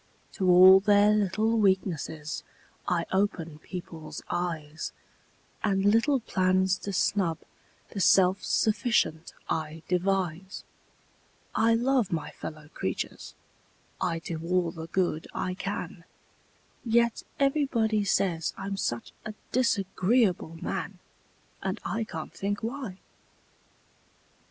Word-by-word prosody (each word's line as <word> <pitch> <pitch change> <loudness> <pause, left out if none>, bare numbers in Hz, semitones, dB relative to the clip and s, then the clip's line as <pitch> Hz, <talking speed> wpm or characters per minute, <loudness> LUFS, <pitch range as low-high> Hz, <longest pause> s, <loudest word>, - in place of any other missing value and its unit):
To 185 -1 0
all 185 +2 +9
their 205 +1 +5
little 215 +2 +1
weaknesses 175 -6 0 0.4
I 170 -2 +1
open 170 -6 -1
people's 165 -4 -8
eyes 165 -3 -3 0.7
And 195 -2 +1
little 230 +6 +3
plans 185 -2 +2
to 200 - -5
snub 185 -3 +1 0.5
the 200 - -6
self 190 +1 +4
sufficient 210 -7 +1
I 155 0 -3
devise; 185 0 -1 0.9
I 225 +1 +3
love 245 -2 +1
my 165 -3 -2
fellow 155 -1 -8
creatures - - -4 0.7
I 175 -3 0
do 165 -1 -5
all 175 0 +1
the 160 -1 -8
good 175 -3 -1
I 185 - -2
can 180 -3 -5 0.8
Yet 235 0 +2 0.2
everybody 260 -7 +2
say 185 -4 +1 0.2
I'm 195 0 -4
such 120 -10 -2
a 215 - -6 0.2
disagreeable 195 -6 +1
man! - - -3 0.6
And 190 +2 -2
I 225 0 -1
can't 160 -6 -7
think 205 +2 -3
why! 230 -5 -4
190 Hz, 110 wpm, -28 LUFS, 170-215 Hz, 0.9 s, all